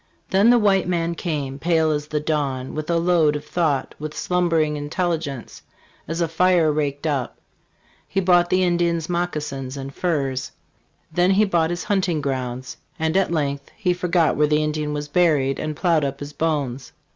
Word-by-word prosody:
"THEN 200 +4 +5
the 245 - +6
white 200 -5 +3
man 170 -1 0
came, 145 -5 -3
pale 160 0 +2
as 150 0 -2
the 150 0 -1
dawn, 145 -4 -2
with 155 +1 -5
a 170 - +2
load 165 -3 +3
of 145 - -5
thought, 155 -6 0
with 150 0 -6
slumbering 165 -4 +1
intelli 160 +3 -1
gence 140 -6 -7 0.5
as 165 +2 -3
a 170 - +2
fire 170 -1 +3
raked 145 -1 -2
up. 140 -5 -1 0.7
He - - -1
bought 175 -2 +4
the 185 0 +3
Indian's 170 -2 +1
moccasins 150 -6 -3
and 135 0 -6
furs; 140 -7 -2 0.6
then 175 +3 +2
he 200 +2 +4
bought 170 -5 +1
his 175 0 -3
hunt 195 -2 0
ing 160 -3 0
grounds; 130 -2 -4 0.2
and 160 0 -1
at 195 -3 +2
length 140 -3 -2
he 185 -5 +1
forgot 175 -2 +1
where 150 0 +3
the 150 0 +2
Indian 150 0 -2
was 150 0 -3
buried 145 -5 +2
and 155 -1 -3
plowed 165 -2 +2
up 140 0 -3
his 145 0 -7
bones." 140 -5 -2
155 Hz, 180 wpm, -22 LUFS, 145-175 Hz, 0.7 s, the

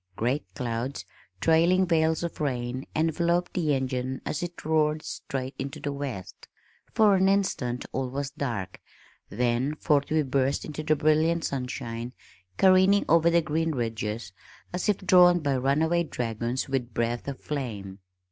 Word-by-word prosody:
Great 125 +8 0
clouds, 125 +1 -3 0.4
trailing 170 +3 +4
veils 160 -1 +2
of 170 -2 -5
rain, 125 -2 -2
enveloped 170 +2 +1
the 155 -5 +1
engine 130 0 -2
as 150 - -2
it 175 -2 -6
roared 155 -1 +1
straight 130 0 -5
into 140 +3 -5
the 145 - -3
west, 135 -10 -6 0.4
for 215 -2 +5
an 190 0 +4
instant 135 -11 0
all 130 -1 -2
was 140 +1 -4
dark, 115 -10 -4 0.5
then 125 +6 0
forth 145 -3 +1
we 155 0 +2
burst 135 0 0
into 155 0 -5
the 155 0 +2
brilliant 155 +3 +2
sunshine 125 -3 -4 0.4
careening 190 +1 +5
over 165 +1 +5
the 170 0 +3
green 160 +1 0
ridges 110 -5 -3 0.4
as 180 +3 -1
if 205 - +3
drawn 180 -2 +6
by 140 -4 0
runaway 155 +6 +2
dragons 120 -3 -3
with 130 -4 -3
breath 120 +2 -1
of 140 -2 -5
flame. 105 -9 -5
140 Hz, 145 wpm, -27 LUFS, 125-165 Hz, 0.5 s, drawn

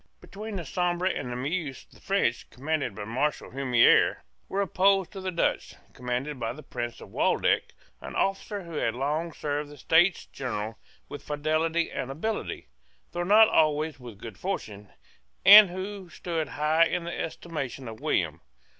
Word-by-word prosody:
Between 210 +1 -8
the 175 -4 -4
Sambre 175 +3 -1
and 135 -9 -1
the - - -3
Meuse 145 +2 -3
the - - -21
French, 195 -12 0
commanded 145 -4 -2
by 105 - -6
Marshal 130 +8 -2
Humieres, 125 -3 +4 0.3
were 195 - -2
opposed 195 -1 +2
to 195 - -7
the 185 - -2
Dutch, 170 -2 -1 0.2
commanded 125 +3 -3
by 115 -1 -2
the 150 +4 -11
Prince 120 -1 -5
of - - -12
Waldeck, - - +1 0.3
an - - -8
officer 195 +1 -1
who 170 - -11
had 115 -4 0
long 150 +6 -1
served 145 -1 -3
the 145 - -12
States 170 +5 +3
General 110 -4 -5 0.3
with 145 - -8
fidelity 155 +3 0
and 135 -1 -4
ability, 210 +11 -3 0.5
though 175 - -3
not 210 +5 +6
always 155 -3 +2
with 120 -5 -10
good 110 +2 -10
fortune, 105 - -5 0.6
and 205 0 +11
who 190 +1 -6
stood 165 -1 -3
high 155 +3 +3
in 170 - -2
the 170 0 -5
estimation 140 -6 -5
of 110 -1 -8
William. - - -1
155 Hz, 165 wpm, -27 LUFS, 130-180 Hz, 0.6 s, and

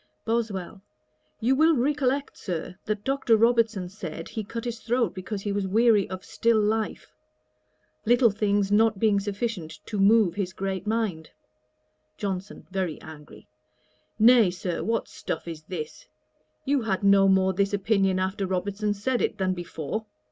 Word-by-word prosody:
BOSWELL. 210 -5 -2 0.6
'You 250 +4 +2
will 320 +3 +4
recollect, 280 +1 0
Sir, 175 -1 -5
that 210 -1 -2
Dr. 265 -4 +2
Robertson 225 -4 +2
said, 170 -4 -7
he 220 - -4
cut 230 +3 -6
his 235 -1 -4
throat 235 -4 0
because 195 +2 -5
he 205 - -2
was 200 -1 -1
weary 215 0 +3
of 185 0 -7
still 230 -1 +2
life; 215 +1 -1 0.9
little 240 0 +4
things 205 -1 0
not 220 0 +4
being 205 -1 +3
sufficient 200 -6 -4
to 210 - -4
move 205 -2 +5
his 185 -2 -3
great 190 +1 -4
mind.' 210 -8 -1 0.9
JOHNSON, 195 0 -5
(very 185 -4 -2
angry.) 150 -2 -13 0.7
'Nay, 230 -2 +6
Sir, 175 -1 -4
what 230 +1 -1
stuff - - -5
is 165 -2 -6
this! 155 -4 -7 0.6
You 280 -1 +2
had 200 -3 -2
no 200 0 +6
more 190 0 +3
this 200 +2 +1
opinion 195 -2 +1
after 190 +1 -1
Robertson 200 +3 -1
said 240 +5 -1
it, - - -1
than 190 -2 0
before. 175 +4 -5
205 Hz, 150 wpm, -26 LUFS, 190-225 Hz, 0.9 s, Nay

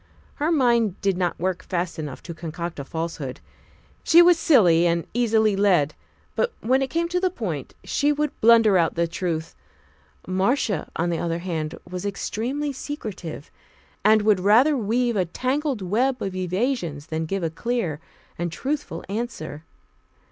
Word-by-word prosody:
Her 305 +3 0
mind 235 - +2
did 195 -2 +1
not 180 -1 -1
work 185 +1 -1
fast 175 -2 -3
enough 150 -4 -6
to 170 - -7
concoct 170 0 -6
a - - -4
falsehood; 160 -3 -5 0.6
she 335 - +6
was 345 -1 +5
silly 175 - +5
and 170 0 0
easily 220 -3 +2
led, 180 -7 +3 0.4
but 485 - +1
when 260 +4 +2
it 270 - -1
came 335 +4 0
to 360 +1 0
the 370 0 +1
point, 180 - -5
she 290 +1 +1
would 295 0 0
blunder 225 -4 +6
out 165 - +1
the 170 0 +1
truth. 165 -1 -3 0.7
Marcia, 190 - 0
on 175 +1 0
the 165 - -1
other 165 -1 -1
hand, 165 -3 -3
was 180 +1 -5
extremely 245 +8 -3
secretive, 210 - -7 0.5
and 215 +1 +5
would 210 -3 +4
rather 230 +11 +5
weave 240 +1 0
a 185 -3 +2
tangled 260 - -2
web 250 +8 +1
of 195 -4 -4
evasions 185 - -2
than 160 0 -3
give 195 +1 -2
a 165 - -1
clear 185 -5 -2 0.4
and 175 -1 -2
truthful 280 - -3
answer. 190 -8 -5
195 Hz, 160 wpm, -24 LUFS, 170-245 Hz, 0.7 s, she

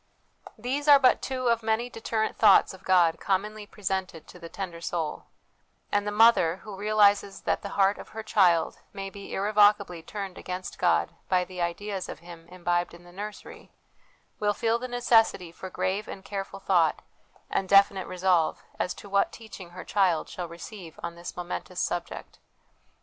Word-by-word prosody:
These 265 +6 -3
are 290 -1 +10
but 260 -2 +4
two 255 -2 -2
of 230 -1 +2
many 220 +2 0
deterrent 225 -2 -2
thoughts 205 -3 +5
of 190 0 -14
God 175 -3 +3
commonly 205 +2 -2
presented 190 -6 -4
to - - -14
the 170 - -9
tender 175 -2 -6
soul; 165 -3 -3 0.7
and 205 0 +1
the - - 0
mother, 210 -6 +5
who 210 -2 -8
realises 205 -1 +3
that - - 0
the 200 - -6
heart 195 0 +3
of - - -10
her 220 0 -7
child 180 -6 +3
may 195 -1 -6
be 200 0 -10
irrevocably 205 -3 +3
turned 195 +1 -7
against 185 0 -6
God - - +2 0.2
by 185 -1 +3
the 180 -1 -7
ideas 190 +3 -3
of - - -6
Him 170 -1 -13
imbibed 175 -1 -1
in 175 - -16
the 175 - -15
nursery, 205 +3 -9 0.7
will 210 0 +1
feel 230 +2 0
the 255 - -4
necessity 225 -7 +2
for 185 +2 -8
grave 195 +3 -2
and 195 - -9
careful 195 -1 -5
thought, 175 -5 +2 0.4
and 190 - -2
definite 195 -1 +5
resolve, 180 -3 +1 0.2
as 180 - -1
to - - -11
what 200 0 +2
teaching 200 -6 -11
her 180 +1 -9
child 185 -6 +2
shall 180 -1 -6
receive 170 0 -10
on 170 - -4
this 170 +1 -9
momentous 180 +1 -5
subject. 175 -1 -4
195 Hz, 170 wpm, -27 LUFS, 175-210 Hz, 0.7 s, are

